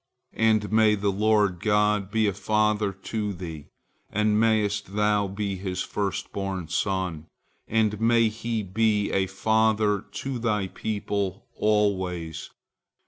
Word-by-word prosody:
And 110 -2 +2
may 110 -1 +5
the 100 0 0
Lord 105 -2 +2
God 105 0 +2
be 110 0 +1
a 100 - +1
father 105 +1 +1
to 105 +2 -4
thee, 80 -5 -8 0.4
and 105 0 +1
mayest 105 -3 +1
thou 105 -1 +2
be 100 0 -3
His 95 0 -3
first 100 -2 -3
born 95 -4 -3
son, 90 -5 -2 0.4
and 110 -1 +1
may 115 0 +4
He 110 0 -3
be 105 +1 +1
a 95 -1 +1
father 105 +1 +2
to 130 -2 -4
thy 105 -5 0
people 100 -2 -3
always. 95 -6 0
105 Hz, 130 wpm, -26 LUFS, 95-110 Hz, 0.4 s, may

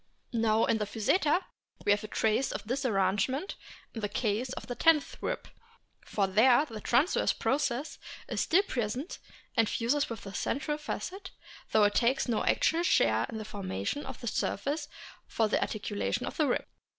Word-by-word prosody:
Now 225 -1 +3
in 225 - +1
Physeter 225 - +1 0.4
we - - +4
have 205 +1 +2
a - - -5
trace 220 +5 +1
of - - -4
this 255 +5 -1
arrange 195 0 +2
ment 280 +9 -3 0.4
in 225 - -5
the 205 - -1
case 225 +3 -1
of - - -7
the 245 - -4
tenth 310 +2 +3
rib, - - -3 0.6
for 200 - 0
there 240 +9 +5
the 225 -7 -8
transverse 265 - +2
process 275 0 -1 0.3
is - - -1
still 365 +5 +4
present 250 - -3 0.4
and 225 -2 +3
fuses 280 +6 +1
with 230 -3 -6
the 195 - -8
central 295 +6 -2
facet, 380 +5 -5 0.4
though 215 - +5
it 205 0 +4
takes 255 +5 +2
no 230 -3 0
actual 330 +1 +2
share 115 - +3
in - - -5
the 215 - -5
formation 200 - -3
of - - -7
the 240 - -5
surface 290 +8 -1 0.4
for 225 - +1
the 215 - +1
articulation 205 - -2
of - - -5
the - - +2
rib. - - 0
230 Hz, 175 wpm, -30 LUFS, 210-285 Hz, 0.6 s, there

